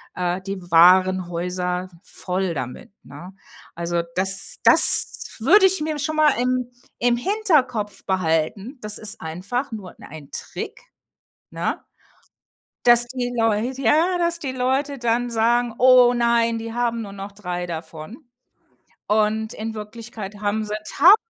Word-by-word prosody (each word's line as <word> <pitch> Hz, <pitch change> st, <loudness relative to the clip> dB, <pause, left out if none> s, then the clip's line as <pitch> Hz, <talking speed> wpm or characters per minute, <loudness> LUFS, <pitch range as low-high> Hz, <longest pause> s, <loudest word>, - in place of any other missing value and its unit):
äh, 180 Hz, 0 st, -2 dB
die 195 Hz, 0 st, -6 dB
Warenhäuser 180 Hz, +1 st, +2 dB
voll 185 Hz, -1 st, -3 dB
damit, 125 Hz, +2 st, -7 dB
ne? 185 Hz, +2 st, -12 dB, 0.4 s
Also, 170 Hz, 0 st, -2 dB
das 195 Hz, +1 st, 0 dB
das -, -, +6 dB
würde 380 Hz, -, +5 dB
ich 380 Hz, -3 st, +2 dB
mir 305 Hz, -1 st, -3 dB
schon 310 Hz, +2 st, -2 dB
mal 305 Hz, -2 st, +4 dB
im 250 Hz, 0 st, -1 dB, 0.3 s
im 240 Hz, 0 st, +2 dB
Hinterkopf 260 Hz, -, 0 dB
behalten. 190 Hz, -, -1 dB
Das 210 Hz, 0 st, -2 dB
ist 215 Hz, 0 st, -4 dB
einfach 200 Hz, -, -4 dB
nur 195 Hz, -5 st, -8 dB
'n -, -, -15 dB
ein 145 Hz, -2 st, -11 dB
Trick, -, -, -7 dB, 0.7 s
ne? -, -, -3 dB, 1.0 s
Dass 240 Hz, 0 st, +6 dB
die 245 Hz, -1 st, -4 dB
Leut 225 Hz, +2 st, 0 dB
Ja, 315 Hz, +8 st, +2 dB
dass 340 Hz, 0 st, 0 dB
die 275 Hz, -6 st, -5 dB
Leute 265 Hz, +2 st, -1 dB
dann 240 Hz, 0 st, -1 dB
sagen: 235 Hz, +1 st, +1 dB
„Oh 250 Hz, -1 st, +6 dB
nein, 235 Hz, -1 st, +1 dB
die 225 Hz, 0 st, -7 dB
haben 235 Hz, -1 st, -1 dB
nur 200 Hz, -2 st, -9 dB
noch 195 Hz, 0 st, -8 dB
3 180 Hz, -3 st, -5 dB
davon.” 165 Hz, -, -9 dB, 0.8 s
Und 215 Hz, +1 st, 0 dB
in 220 Hz, +1 st, -6 dB
Wirklichkeit 215 Hz, -1 st, -9 dB
haben 210 Hz, +1 st, -1 dB
sie 210 Hz, -, -5 dB, 0.2 s
1.000 355 Hz, +8 st, +8 dB
220 Hz, 140 wpm, -22 LUFS, 185-250 Hz, 1.0 s, 1.000